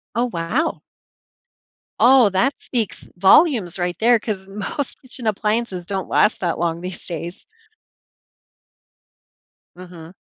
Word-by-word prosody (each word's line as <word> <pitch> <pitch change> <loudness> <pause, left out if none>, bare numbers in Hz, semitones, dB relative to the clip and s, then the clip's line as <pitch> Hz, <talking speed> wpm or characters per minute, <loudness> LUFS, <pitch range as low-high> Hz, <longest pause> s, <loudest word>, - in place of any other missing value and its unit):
Oh, 240 - +2
wow. 220 - -2 1.2
Oh, 255 -3 +6
that 240 +9 +1
speaks 230 -5 -4
volumes 195 - +4
right 175 -1 -2
there 235 +1 +4
'cause 200 -3 -5
most 210 +7 -4 0.3
appliances 210 -3 -1
don't 190 0 -4
last 210 - +2
that 175 -3 -1
long 170 0 -1
these 185 0 -7
days. 170 +1 -5 2.3
Mhm. 175 -2 -12
195 Hz, 105 wpm, -20 LUFS, 175-235 Hz, 2.3 s, Oh